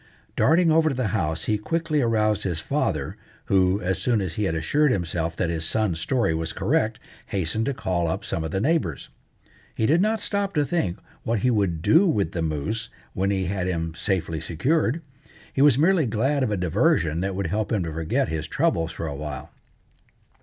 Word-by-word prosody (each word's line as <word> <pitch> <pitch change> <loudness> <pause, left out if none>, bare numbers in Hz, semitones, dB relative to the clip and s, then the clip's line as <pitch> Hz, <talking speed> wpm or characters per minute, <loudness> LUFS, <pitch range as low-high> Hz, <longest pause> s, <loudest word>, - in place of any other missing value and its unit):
Darting 165 +1 +4
over 160 0 +4
to 135 - -2
the 125 -4 -1
house 80 -5 -1
he 105 -1 0
quickly 160 +4 0
aroused 110 -3 +2
his 85 -5 -2
father, - - -2 0.3
who, 95 0 +3
as 95 +1 -1
soon 115 +2 +1
as 95 -4 -2
he 105 +3 -1
had 80 - -1
assured 145 - +2
himself 85 -3 -1
that 85 -2 -1
his 80 -1 -2
son's 95 -2 0
story 115 -1 +1
was 80 0 -3
correct, - - 0 0.3
hastened 100 +5 -1
to 140 - 0
call 85 -6 -1
up 80 - -3
some 80 - -2
of 80 - -3
the 95 - -1
neighbours. 135 - 0 0.7
He 110 - +1
did 160 +8 +4
not 215 +2 +1
stop 200 -2 -2
to 150 - +2
think 130 - -1 0.2
what 115 -3 -1
he 125 - +3
would 95 -7 0
do 180 +5 +5
with 100 - +1
the 85 - -3
moose 80 +8 -2 0.2
when 95 +1 0
he 95 -2 0
had 95 -1 -2
him 85 -2 -2
safely 85 -3 -2
secured. 150 - 0 0.5
He 135 - +1
was 140 -3 +6
merely 165 -1 +3
glad 130 +7 +1
of 130 - +1
a 105 - -1
diversion 90 - +1
that 95 +1 -2
would 100 0 -2
help 110 0 -1
him 105 -5 +1
to 80 -2 -4
forget 80 0 0
his 80 -1 -3
troubles 80 +1 0
for 80 - -5
a 75 - -3
while. 75 0 -6
100 Hz, 205 wpm, -24 LUFS, 85-135 Hz, 0.7 s, was